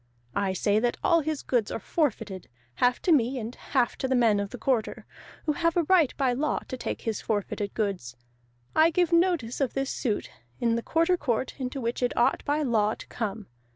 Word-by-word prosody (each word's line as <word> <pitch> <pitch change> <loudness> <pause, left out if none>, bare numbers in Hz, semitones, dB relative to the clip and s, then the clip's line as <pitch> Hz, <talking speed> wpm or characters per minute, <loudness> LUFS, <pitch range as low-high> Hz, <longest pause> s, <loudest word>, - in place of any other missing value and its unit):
I 195 -2 +1
say 205 +2 +2
that 240 +1 0
all 335 -2 +4
his 310 -1 -3
goods 235 -5 +1
are - - -3
forfeited, 215 - -2 0.2
half 245 - +2
to 360 - +2
me, 265 -3 +3
and 235 0 -5
half 255 -3 0
to 265 - -1
the 260 - +1
men 225 -4 +4
of 200 0 -2
the 250 - -8
Quarter, 235 -1 -1 0.4
who 310 - +2
have 335 +2 0
a 345 - +4
right 330 -4 +4
by 265 -3 +2
law 295 +5 0
to - - -3
take 255 - -4
his 225 -2 -2
forfeited 205 -1 -2
goods; 195 - -2 0.6
I 315 +1 +6
give 350 0 +1
notice 335 -9 +2
of 265 - 0
this 270 0 -1
suit 225 -7 -2 0.3
in 235 -1 +2
the 235 - 0
Quarter 330 +7 +2
Court 250 -4 -1
into 260 +1 -3
which 235 0 -2
it 245 - 0
ought 240 - +2
by 300 +1 +1
law 220 -5 +2
to - - -11
come. 215 -2 -4
245 Hz, 210 wpm, -27 LUFS, 220-300 Hz, 0.6 s, I